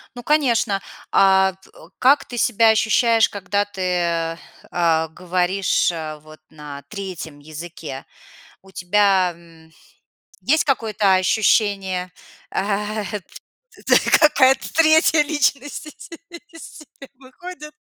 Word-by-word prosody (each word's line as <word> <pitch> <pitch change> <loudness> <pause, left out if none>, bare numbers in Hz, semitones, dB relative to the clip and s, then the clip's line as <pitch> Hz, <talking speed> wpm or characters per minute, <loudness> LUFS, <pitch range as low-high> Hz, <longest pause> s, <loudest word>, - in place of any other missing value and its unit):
Ну, 245 - -9
конечно. 235 -9 +1 0.3
А 190 -1 +4 0.4
как 270 +3 +4
ты 240 - -8
себя 225 -1 +3
ощущаешь, 220 +1 +3
когда 200 0 -2
ты, 175 -4 -2 0.3
а, 165 -2 +1
говоришь, 180 +3 0
а, 155 -2 -7
вот 155 +1 -16
на 145 -2 -10
3 180 -6 -8
языке? 155 -2 -9 0.6
У 195 - -19
тебя, 190 0 +2
м, 165 -1 -20 0.7
есть 310 +4 +2
какое-то 220 -7 +1
ощущение, 190 -2 +1 2.1
какая-то 270 -4 +3
3 315 -1 +4
личность 290 -1 -2 0.6
из 330 -1 -12
себя 285 -2 -15
выходит? 300 +4 -11
195 Hz, 95 wpm, -20 LUFS, 170-250 Hz, 2.1 s, А